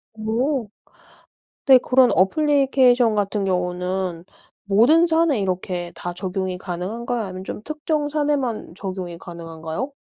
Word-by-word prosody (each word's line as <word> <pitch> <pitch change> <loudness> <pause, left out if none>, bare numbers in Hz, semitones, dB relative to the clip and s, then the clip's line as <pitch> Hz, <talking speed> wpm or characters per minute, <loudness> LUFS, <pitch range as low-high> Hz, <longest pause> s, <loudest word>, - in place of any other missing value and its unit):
오. 225 +2 -1 1.0
근데 265 -3 +8
그런 255 -1 +4
애플리케이션 260 - +3
같은 205 -1 -1
경우는 180 -1 -2 0.4
모든 240 - +5
산에 320 -7 +2
이렇게 180 -2 -3
다 175 0 -6
적용이 185 0 -3
가능한가요 220 +7 -4
아니면 185 -1 -7
좀 - - -6
특정 305 -1 -2
산에만 285 - -1
적용이 185 -3 -6
가능한가요? 165 - -6
210 Hz, 290 characters per minute, -22 LUFS, 180-265 Hz, 1.0 s, 근데